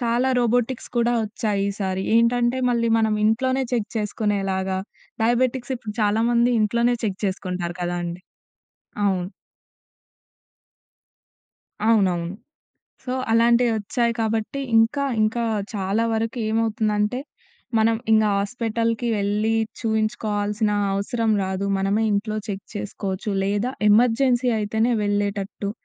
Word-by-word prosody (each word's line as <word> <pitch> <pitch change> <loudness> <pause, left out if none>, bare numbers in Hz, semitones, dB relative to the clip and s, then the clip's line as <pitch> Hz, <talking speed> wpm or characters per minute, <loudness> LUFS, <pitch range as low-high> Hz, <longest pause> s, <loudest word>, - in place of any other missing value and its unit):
చాలా 240 +2 +1
రోబోటిక్స్ 245 +1 0
కూడా 235 0 +2
వచ్చాయి 210 -2 -1
ఈ 200 - -2
సారి. 190 0 -1
ఏంటంటే 240 +2 +3
మళ్ళీ 235 -1 +1
మనం 220 -1 +2
ఇంట్లోనే 260 +4 +2
చెక్ 220 -4 0
చేసుకునేలాగా 195 -3 -1 0.4
డయాబెటిక్స్ 245 +2 +1
ఇప్పుడు 215 -3 -7
చాలా 210 +2 +2
మంది 240 +1 +3
ఇంట్లోనే 235 +3 +2
చెక్ 195 -3 -2
చేసుకుంటారు 180 -2 -3
కదండీ. 175 0 -3 0.8
అవును. 185 -3 +1 2.6
అవునవును. 185 -5 +2 0.7
సో 250 - -3 0.2
అలాంటివొచ్చాయి 235 0 +2
కాబట్టి 225 +4 -1 0.2
ఇంకా 230 +6 +3 0.2
ఇంకా 225 +2 +1 0.3
చాలా 200 +3 0
వరకు 225 +2 -1
ఏమవుతుందంటే, 220 +1 0 0.6
మనం 225 +1 +3 0.2
ఇంగా 215 -1 +4
హాస్పిటల్‌కి 230 +2 -1
వెళ్ళి, 210 +2 0 0.3
చూయించుకోవాల్సిన 215 -1 0 0.2
అవసరం 220 +3 0
రాదు. 190 +1 -2
మనమే 200 +3 +1
ఇంట్లో 215 +1 -1
చెక్ 195 -1 -4
చేసుకోవచ్చు 200 0 -4
లేదా 205 +6 0 0.2
ఎమర్జెన్సీ 245 +3 +3
అయితేనే 220 +3 +1
వెళ్ళేటట్టు. 205 0 -2
220 Hz, 105 wpm, -23 LUFS, 200-235 Hz, 2.6 s, ఇంగా